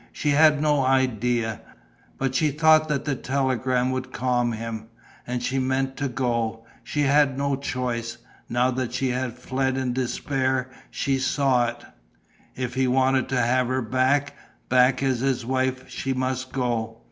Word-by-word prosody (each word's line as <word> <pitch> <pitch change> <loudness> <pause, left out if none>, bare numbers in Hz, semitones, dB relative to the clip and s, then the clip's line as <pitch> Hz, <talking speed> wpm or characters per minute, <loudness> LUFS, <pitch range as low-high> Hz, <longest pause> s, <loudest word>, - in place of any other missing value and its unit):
She 150 - -2
had 150 0 +5
no 150 -2 +2
idea. 120 -4 +1 0.6
But 135 -1 -1
she 150 +3 +2
thought 155 +2 +4
that 140 -2 -1
the 145 - 0
telegram 130 -1 0
would 130 0 -4
calm 120 -1 0
him. 110 0 -5 0.4
And 125 0 -3
she 135 +2 0
meant 130 +1 0
to 145 - -1
go. 115 -3 -2 0.2
She 150 - -2
had 140 -1 +3
no 140 0 0
choice. 125 -4 -3 0.3
Now 125 +2 +2
that 125 -1 -3
she 130 0 0
had 125 -1 -2
fled 130 +1 -1
in 130 -2 -1
despair, 130 0 -1 0.2
she 135 -1 -1
saw 130 -2 +2
it: 120 0 -7 0.7
if 125 -1 -3
he 130 0 +1
wanted 130 0 +2
to 130 - +1
have 125 +1 +2
her 130 0 -1
back, 130 +4 +1 0.4
back 125 +1 +4
as 130 -3 +1
his 130 -2 0
wife, 130 0 -1
she 135 - -3
must 130 0 -2
go. 115 -3 -2
130 Hz, 160 wpm, -24 LUFS, 125-135 Hz, 0.7 s, had